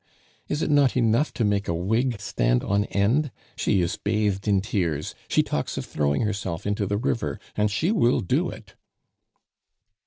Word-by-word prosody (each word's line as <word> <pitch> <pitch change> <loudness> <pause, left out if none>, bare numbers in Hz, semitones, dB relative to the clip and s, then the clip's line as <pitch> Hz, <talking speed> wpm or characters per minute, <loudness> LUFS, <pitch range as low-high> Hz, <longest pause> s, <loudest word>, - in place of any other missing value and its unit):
Is 150 - -1
it - - 0
not 140 -3 +4
enough 120 +5 +2
to 115 - +1
make 100 -1 0
a 85 - 0
wig 110 +7 0
stand - - +1
on 100 +1 +1
end? 120 +11 +1 0.3
She 95 - +1
is 85 0 -1
bathed 105 -1 0
in 100 -2 +4
tears; 90 -7 -2
she - - +3
talks - - -3
of - - -3
throwing 70 -1 0
herself 100 -4 -2
into 100 0 0
the 100 - 0
river 90 - -1 0.2
and 105 0 +2
she 155 - 0
will 125 - +3
do 90 - 0
it." - - -11
105 Hz, 175 wpm, -25 LUFS, 95-115 Hz, 0.3 s, not